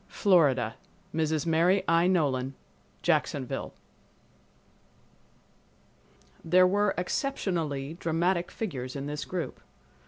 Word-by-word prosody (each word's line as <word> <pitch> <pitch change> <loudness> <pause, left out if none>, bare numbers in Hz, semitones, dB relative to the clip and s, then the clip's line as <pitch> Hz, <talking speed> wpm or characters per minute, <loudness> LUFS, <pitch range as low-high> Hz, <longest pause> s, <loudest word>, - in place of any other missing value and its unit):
Florida—Mrs. 155 - +1
Mary 170 +4 +3
I. 165 +1 +4
Nolan, 135 -7 +1 0.5
Jacksonville. - - 0 2.7
There 185 +2 +5
were 205 +2 +2
exceptionally 170 - -2
dramatic 170 +2 0
figures 130 - -5
in 140 0 -4
this 150 +1 -4
group. 180 -3 -5
165 Hz, 75 wpm, -28 LUFS, 145-185 Hz, 2.7 s, There